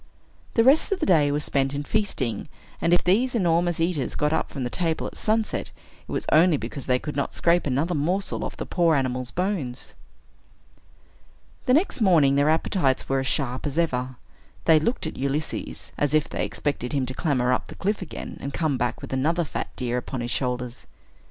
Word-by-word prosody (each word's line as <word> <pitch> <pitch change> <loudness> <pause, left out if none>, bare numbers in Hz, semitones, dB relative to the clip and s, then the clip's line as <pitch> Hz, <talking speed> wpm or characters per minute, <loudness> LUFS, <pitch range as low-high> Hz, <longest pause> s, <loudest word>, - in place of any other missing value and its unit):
The 230 - +5
rest 275 +10 +5
of 395 - +1
the - - 0
day 150 -6 +4
was 145 +1 -1
spent 135 0 0
in 145 - -2
feasting; 145 - -1 0.3
and 170 - +2
if 175 - +4
these 240 +8 +2
enormous 175 -4 +2
eaters 165 -6 0
got 150 +1 +1
up - - 0
from 130 -3 -3
table 165 +5 -1
at - - -6
sunset, 220 0 0 0.4
it - - -9
was - - -2
only 160 0 +5
because 125 +2 -6
they 125 -1 +3
could 150 +3 -6
not 140 - -2
scrape 170 -1 +2
another 145 +7 0
morsel 175 +6 -1
off - - -5
the - - -4
poor 170 -3 +2
animal's 130 -2 -1
bones. 175 -10 -3 1.7
The 255 - +5
next 320 - +1
morning, 165 -9 +5
their 145 +2 +3
appetites 160 -3 +1
were 135 0 +1
as 130 - -2
sharp 130 +1 -1
as 145 - -4
ever. 130 -6 0 0.5
They 160 -2 +6
looked 235 +8 -1
at 160 - -5
Ulysses, 140 +3 -3
as 145 +1 +2
if 155 -1 +2
they - - -2
expected 140 -3 -3
him 135 -2 +1
to 130 - -5
clamber 130 -5 +1
up - - -1
the - - -10
cliff 205 +2 -1
again, 180 - -7
and 140 - -4
come 155 -6 0
back 120 0 -2
with - - -6
another 160 +6 +1
fat 155 - -4
deer 125 -1 -1
upon 125 +1 -5
his 120 +1 -3
shoulders. 125 -2 -3
150 Hz, 195 wpm, -25 LUFS, 130-175 Hz, 1.7 s, They